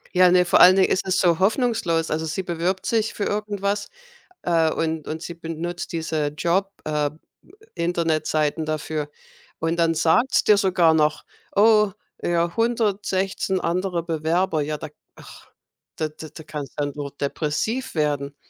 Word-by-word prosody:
Ja, 180 0 +6
ne, 180 0 +4
vor - - +4
allen 185 +1 +9
Dingen 190 -1 +4
ist 190 - 0
es 190 - +1
so 170 -3 +3
hoffnungslos. 190 - +1
Also, 160 +1 -1
sie 185 +4 -3
bewirbt 175 +2 -2
sich 225 -1 0
für 205 - -2
irgendwas, 205 -1 -2 0.5
äh, 165 -2 +2
und 160 -1 -2
und 160 +1 -4
sie 170 0 -6
benutzt 170 +1 -5
diese 160 -2 -1
Job 180 +6 0
äh, 150 -1 -1 0.6
Internetseiten 160 -2 0
dafür 155 -1 -3 0.5
und 165 +1 -1
dann 165 -1 +2
sagt's 165 +11 +3
dir 210 -1 +5
sogar 180 -5 +3
noch: 155 -1 +1 0.3
„Oh, 210 -1 +5 0.3
ja, 170 +1 0
116 200 -5 0
andere 175 0 -1
Bewerber.“ 165 +1 0
Ja, 150 +1 -2
da 155 - -7 0.3
ach, - - -15 0.4
da 155 -1 -2
da 155 0 -10
da 160 +1 -11
kannst 150 -4 -7
du - - +1
dann 145 -1 -3
nur 145 -1 -5
depressiv 165 - -2
werden. 145 -2 -1
170 Hz, 155 wpm, -23 LUFS, 155-190 Hz, 0.6 s, allen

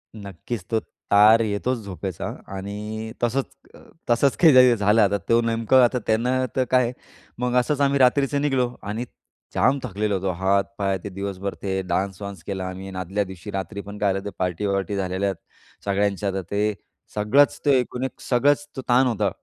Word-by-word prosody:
नक्कीच, 100 +1 -6
तो 110 - +2
तार 105 +1 +4
येतोच 110 +3 -1
झोपेचा. 95 -2 -5 0.2
आणि 105 +3 -5
तसंच 125 +3 +1 0.3
अ, - - -15 0.3
तसंच 125 +3 +3
काही 130 -7 +7
झालं 105 +1 +3
आता, 100 0 +3
तो 115 0 +5
नेमकं 115 +2 +3
आता 125 +1 +2
त्यांना 125 +4 +1
तर 130 - +2
काय. 125 -2 +3 0.5
मग 125 0 -1
असंच 145 +3 0
आम्ही 140 0 +2
रात्रीचं 140 +2 +3
निघलो 130 -4 +1
आणि 105 +4 -3 0.5
जाम 135 +2 +3
थकलेलो 105 -3 -1
होतो. 95 0 -1
हात, 95 +3 +1
पाय 95 -1 0
ते - - -5
दिवसभर 100 0 -4
ते 95 -1 -1
डान्स 95 +1 -2
वान्स 100 -4 -7
केला. 95 0 -4
आम्ही 95 +1 -7
आदल्या 95 +3 -1
दिवशी 95 +1 -9
रात्री 95 +1 -4
पण 100 +1 -9
काय 105 -1 +1
झालं 95 - -2
होतं, - - -12
ते 95 - -16
पार्टी-वार्टी 100 +2 -1
झालेल्या 95 0 -1
आहेत 95 - -12
सगळ्यांच्या. 100 0 0
तर 95 - -2
ते 105 +1 +1 0.4
सगळंच 110 +8 +3
ते 140 -2 +5
एकूण 125 +1 -3
एक 130 - -4
सगळंच 145 +3 +2
तो 130 - -4
ताण 125 +2 +5
होता. 115 -4 +1
105 Hz, 180 wpm, -23 LUFS, 100-125 Hz, 0.5 s, काही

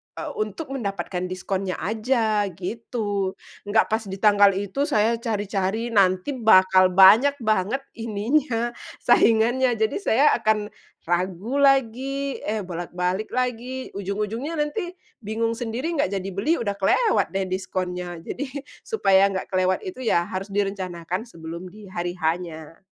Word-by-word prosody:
eee, - - -5
untuk 215 +8 -4
mendapatkan 195 -7 -3
diskonnya 185 0 -3
aja 220 0 +1
gitu. 205 0 -3 0.3
Nggak 215 +2 +3
pas 220 - +2
di 190 - -5
tanggal 205 -2 +5
itu 205 +9 -2
saya 230 -4 +2
cari-cari, 210 0 -2
nanti 185 +2 +3
bakal 185 -4 +6
banyak 220 +9 +7
banget 215 +5 0 0.2
ininya, 230 +2 0 0.3
saingannya, 240 +3 +4
jadi 220 0 0
saya 280 - +2
akan 215 -2 0 0.4
ragu 185 +7 -1
lagi, 275 +1 +2
eh 215 +1 -1
bolak-balik 180 +3 -3
lagi, 255 +1 -2
ujung-ujungnya 210 - -3
nanti 350 +5 -2 0.3
bingung 225 +2 -1
sendiri, 245 +8 -3
nggak 280 - 0
jadi 190 +1 -5
beli, 300 - +1
udah 200 -3 -2
kelewat 425 - +2
deh 190 0 -1
diskonnya, 180 -2 -4
jadi 245 +10 -5 0.4
supaya 195 - +3
nggak 190 -1 -4
kelewat 185 0 +2
itu 260 -9 -6
ya 175 -7 +2
harus 195 +2 -5
direncanakan 185 -2 -2
sebelum 170 -4 -9
di 210 +1 -13
hari 175 -1 -3
H-nya. 165 -1 -4
210 Hz, 130 wpm, -24 LUFS, 185-235 Hz, 0.4 s, banyak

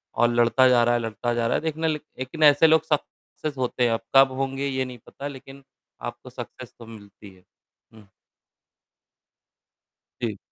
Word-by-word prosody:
और 120 +1 +3
लड़ता 120 +2 +4
जा 120 -2 +5
रहा 120 +1 +3
है - - +1
लड़ता 115 +1 -3
जा 120 -1 0
रहा - - +1
है। - - 0
देखना 160 0 -1
लेक 155 -1 -2 0.2
लेकिन 130 +5 -3
ऐसे 145 +2 +7
लोग 160 -1 +4
सक्सेस 150 -1 -4
होते 125 -1 -1
हैं 120 - +3
अब 115 - -2
कब 135 0 +7
होंगे 135 +1 -2
ये 130 -1 -1
नहीं 125 -1 -9
पता 140 - -7
लेकिन 135 0 -11 0.5
आपको - - -13
सक्सेस - - -10
तो 115 - -11
मिलती 105 -2 -13
है। 90 - -23 2.8
जी। 110 -4 -2
130 Hz, 170 wpm, -24 LUFS, 120-145 Hz, 2.8 s, ऐसे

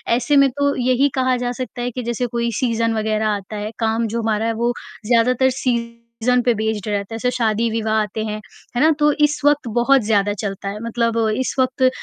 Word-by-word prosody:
ऐसे 255 +4 +1
में 275 -1 +6
तो 285 0 +1
यही 255 +3 +3
कहा 255 -1 +2
जा 245 - -1
सकता 250 -1 -6
है 245 0 -2
कि 250 +1 -5
जैसे 240 +1 -2
कोई 235 0 -1
सीज़न 230 -2 0
वग़ैरह 215 0 0
आता 205 0 -3
है, 210 +1 -4
काम 225 0 0
जो 230 +2 -2
हमारा 220 0 0
है 230 - 0
वो 235 +2 0 0.3
ज़्यादातर 250 +3 +3
सीज़न 235 0 -1
पे 240 - +4
बेस्ड 220 -1 -2
रहता 205 +1 -2
है, - - -3
जैसे 250 +2 0
शादी-विवाह 220 -1 0
आते 215 +1 -3
हैं, 215 0 -4 0.4
है 245 - +1
ना? 315 +1 +5
तो 295 0 +4
इस 295 0 +1
वक़्त 290 -3 +3
बहुत 270 +2 +4
ज़्यादा 205 -1 +2
चलता 195 -1 -4
है, 210 +1 -6
मतलब 230 0 -1 0.2
इस 260 - -2
वक़्त 260 0 +3
235 Hz, 210 wpm, -20 LUFS, 220-250 Hz, 0.4 s, में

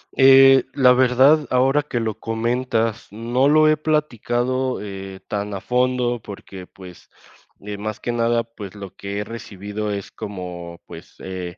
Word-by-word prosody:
Eh, 135 0 +7
la 125 -2 +5
verdad, 130 +4 +4
ahora 135 +3 +3
que 145 -5 -3
lo 110 -2 -3
comentas, 115 0 -1
no 120 +5 0
lo 155 +1 +5
he 155 0 +4
platicado, 130 -4 -1
eh, 95 -2 -8
tan 100 0 -3
a - - -4
fondo 125 -1 0
porque 95 -2 -10
pues, 90 -2 -14 0.5
eh, 105 0 -6
más 110 0 -5
que 120 - -3
nada, 115 0 +1
pues 105 -4 -11
lo 100 -2 -9
que 100 0 -5
he - - -2
recibido 105 -1 -6
es 100 -1 -5
como 90 -3 -7
pues, - - -12
eh, 90 -2 -6
115 Hz, 155 wpm, -21 LUFS, 100-130 Hz, 0.5 s, Eh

